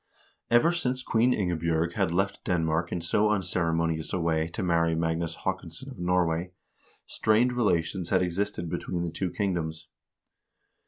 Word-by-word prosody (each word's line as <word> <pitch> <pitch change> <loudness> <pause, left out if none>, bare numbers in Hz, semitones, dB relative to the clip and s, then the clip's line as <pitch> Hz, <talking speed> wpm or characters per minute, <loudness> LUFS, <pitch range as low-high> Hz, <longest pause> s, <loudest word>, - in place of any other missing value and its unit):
Ever 120 +9 +5
since 130 -7 -1
Queen 115 +2 +3
Ingebj0rg 85 -5 0
had 80 - 0
left 95 +3 -1
Denmark 80 -1 0
in 90 - -2
so 105 +5 +2
unceremonious 85 -5 0
a 95 - -1
way 80 -1 +1
to 85 - -4
'marry 85 -2 +2
Magnus 80 0 -1
Haakonsson 95 +8 -4
of 115 - -11
Norway, 90 0 0 0.5
strained 115 +3 +2
relations 90 -6 0
had 95 -1 +3
existed 90 0 -2
between 85 +1 -3
the 85 - -3
two 90 +3 -2
kingdoms. 85 -5 -3
85 Hz, 145 wpm, -27 LUFS, 80-100 Hz, 0.5 s, Ever